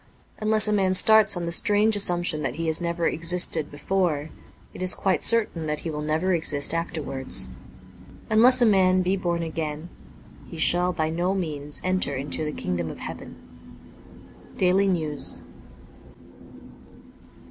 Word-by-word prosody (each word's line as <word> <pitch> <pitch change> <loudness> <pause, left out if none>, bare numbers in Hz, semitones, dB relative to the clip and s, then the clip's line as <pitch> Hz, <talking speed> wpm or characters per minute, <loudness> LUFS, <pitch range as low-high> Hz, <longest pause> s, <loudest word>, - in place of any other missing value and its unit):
Unless 215 0 +2
a 210 - +1
man 190 -2 +1
starts 220 -1 +5
on 175 - -4
the 170 - -3
strange 210 +5 +2
assumption 175 -5 0
that 135 -3 -3
he 165 +1 -4
has 160 +1 0
never 170 -1 -1
existed 165 -2 0
before, 160 -1 -2 0.4
it - - -10
is 185 0 +2
quite 190 -2 0
certain 210 -8 +2
that 150 0 -3
he 165 - -5
will 150 0 -5
never 160 +5 -1
exist 155 -4 0
afterwards. 145 - -1 0.8
Unless 245 +3 +5
a - - +5
man 185 -3 +3
be 185 +2 0
born 175 -3 -2
again, 160 0 -5 0.5
he 170 - -11
shall 175 +3 +2
by 160 -3 -2
no 175 +4 -1
means 150 -5 -4
enter 185 -6 0
into 140 +3 -3
the 150 - -3
Kingdom 85 - -4
of - - -8
Heaven. - - -9 0.6
' - - -21
Daily 190 +2 +2
Nezus. 155 -6 -2
170 Hz, 150 wpm, -24 LUFS, 155-190 Hz, 0.8 s, starts